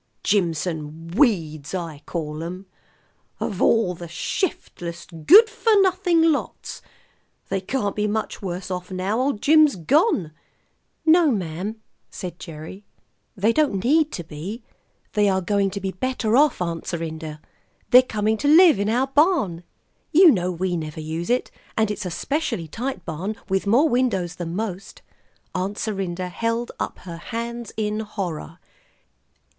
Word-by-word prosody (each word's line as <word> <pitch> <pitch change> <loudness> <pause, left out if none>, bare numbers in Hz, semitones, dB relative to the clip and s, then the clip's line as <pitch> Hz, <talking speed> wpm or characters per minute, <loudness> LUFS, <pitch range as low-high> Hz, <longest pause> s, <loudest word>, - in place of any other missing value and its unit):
"Jimson 165 -4 -1
weeds 165 - +1
I 165 -5 -5
call 155 -2 -4
'em. 180 +3 -6 0.7
Of 200 -4 -3
all 225 -6 +3
the 170 0 -8
shiftless, 170 - -4
good 325 - +6
for 440 -1 +2
nothing 355 -4 +3
lots! 295 - -4 0.7
They 195 -1 -1
can't 205 0 -2
be 210 0 0
much 220 +1 -3
worse 185 0 -5
off 180 0 -4
now 190 +4 -1
old 260 -5 -1
Jim's 310 -1 +6
gone." 205 - +2 0.7
"No, 325 0 +6
ma'am," 190 - -2 0.3
said 180 -3 -7
Gerry; 165 +4 -9 0.5
"they 215 +4 +3
don't 250 -11 +1
need 310 +4 +3
to 175 - -4
be. 170 +10 -7 0.5
They 210 -1 +3
are 190 -1 +2
going 200 +1 +1
to 200 +1 -5
be 190 -1 -3
better 230 +2 -1
off, 285 -8 +4
Aunt 170 -1 -4
Serinda. 160 -2 -5 0.5
They're 250 - +10
coming 220 -3 -1
to 285 - -1
live 320 - +7
in 205 +1 0
our 245 +4 +2
barn. 275 - +2 0.5
You 340 +1 +8
know 180 -5 0
we 180 +1 -2
never 155 -2 -5
use 160 +4 -4
it, 250 +1 0 0.3
and 220 -1 +2
it's 210 -2 -4
a - - -3
specially 275 - -2
tight 230 - -5
barn, 180 +7 -4
with 195 +1 0
more 250 +10 +5
windows 200 - 0
than 170 -1 -4
most." 195 -2 -5 0.5
Aunt 190 +3 -2
Serinda 185 -4 -3
held 230 +5 -2
up - - -3
her 170 -2 -8
hands 235 +4 -5
in 210 0 -1
horror. 185 -6 -5
200 Hz, 150 wpm, -23 LUFS, 175-245 Hz, 0.7 s, They're